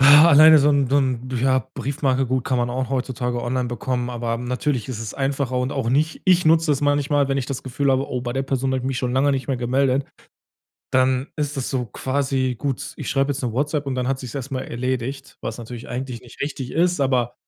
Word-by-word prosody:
Alleine 150 +2 +8
so 145 +1 +4
'n 140 -2 +2
so 140 - +3
'n 130 -2 0
ja, 130 0 +4 0.2
Briefmarke, 135 0 0
gut 130 +1 0
kann 130 - 0
man 120 0 0
auch 130 0 -2
heutzutage 125 -2 -2
online 125 0 -1
bekommen. 125 0 -2
Aber 115 -1 -2
natürlich 125 +1 -2
ist 125 -4 -4
es 115 -1 -5
einfacher 135 -2 -1
und 125 +2 -1
auch 130 -4 -1
nicht 155 +5 0
ich 180 -3 +4
nutze 160 -1 +4
es 135 - -1
manchmal, 145 -1 +2
wenn 135 - 0
ich 135 - -1
das 130 0 -5
Gefühl 135 +2 0
habe, 135 +1 0
oh, 125 -1 -3
bei 120 - -3
der 135 +2 -1
Person 135 -1 -1
habe 130 - +1
ich 130 - -6
mich 135 -2 -1
schon 125 -1 -1
lange 135 +2 +3
nicht 135 -2 -1
mehr 135 -3 -1
gemeldet, 130 +2 +1 0.9
dann 130 +1 +2
ist 150 -1 -3
das 130 - -2
so 125 -3 -1
quasi, 130 +1 -1
gut, 140 -1 -3
ich - - -5
schreibe 135 +1 +1
jetzt 140 0 -4
´ne 120 -3 -2
WhatsApp 145 +2 -1
und 130 - -1
dann 125 -1 -1
hat 135 0 -1
sich's 130 0 -8
erst 135 +1 -5
mal 130 -1 -2
erledigt, 130 +2 -4
was 115 - -4
natürlich 120 0 -8
eigentlich 125 -1 -5
nicht 120 - -15
richtig 140 -3 -4
ist, 175 -1 +1
aber 125 -3 +1
130 Hz, 235 wpm, -22 LUFS, 125-140 Hz, 0.9 s, Alleine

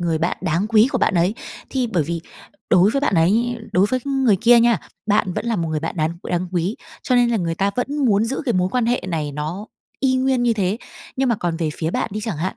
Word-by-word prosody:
người 165 -2 0
bạn 170 +2 -1
đáng 170 +6 0
quý 220 +2 +4
của 255 - +1
bạn 205 - +1
ấy, 175 +5 +2 0.4
thì 255 -2 0
bởi 180 -8 0
vì 170 +1 -3 0.5
đối 185 +4 +5
với 275 - 0
bạn 280 -9 +1
ấy, 225 +9 +2 0.2
đối 190 +3 +4
với 255 +4 -1
người 265 -7 +2
kia 235 0 +6
nha, 235 -1 +3 0.3
bạn 205 -3 +2
vẫn 230 - -3
là 230 -2 0
một 165 -2 -2
người 155 -1 -2
bạn 165 +3 -4
đáng 155 0 +1 0.2
đáng 175 0 -1
quý, 180 +5 -1 0.3
cho 250 - 0
nên 240 -1 +4
là 230 - +1
người 165 -4 -1
ta 195 +3 0
vẫn 275 +4 -2
muốn 210 -2 +3
giữ 265 +6 -3
cái 240 - +1
mối 180 0 +1
quan 245 -2 0
hệ 240 -4 0
này 150 -4 -2
nó 160 +8 -5 0.3
y 260 -1 +2
nguyên 260 -1 +1
như 240 -1 +3
thế. 200 -1 0 0.4
Nhưng 265 -1 +1
mà 235 - +3
còn 170 -3 -2
về 160 -2 -1
phía 160 0 -1
bạn - - -1
đi 215 - -3
chẳng 210 -8 -3
hạn, 180 +5 -3
205 Hz, 265 wpm, -21 LUFS, 170-240 Hz, 0.5 s, kia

